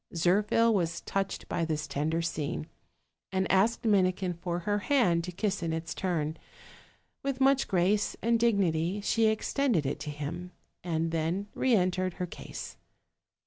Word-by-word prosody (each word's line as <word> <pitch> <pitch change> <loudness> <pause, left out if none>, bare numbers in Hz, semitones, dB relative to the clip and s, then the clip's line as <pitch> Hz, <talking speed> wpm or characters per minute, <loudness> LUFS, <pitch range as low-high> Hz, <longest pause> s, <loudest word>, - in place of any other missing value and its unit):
.Zirpbil 210 +7 +3
was 170 -4 0
touched 195 0 -3
by 170 - -1
this 155 -1 -1
tender 155 +3 -1
scene, 145 - -2 0.7
and 190 0 +1
asked 215 +5 +2
Minikin 185 -3 +2
for 175 0 -3
her 205 +3 0
hand 200 - +2
to 180 - -5
kiss 195 +1 -1
in 165 -1 -1
its 160 -1 -3
turn: 160 -4 -1 0.8
with 275 -1 -2
much 270 0 +4
grace 195 +3 +1
and 230 +1 +2
dignity 195 -5 +2
she 225 +2 +2
extended 220 - +1
it - - -2
to 150 - -5
him, 165 +5 -5 0.3
and 165 -1 -1
then 165 +5 -1
re 260 -3 +3
entered 185 -1 +1
her 180 - -2
case. 175 - -8
180 Hz, 150 wpm, -29 LUFS, 165-210 Hz, 0.8 s, much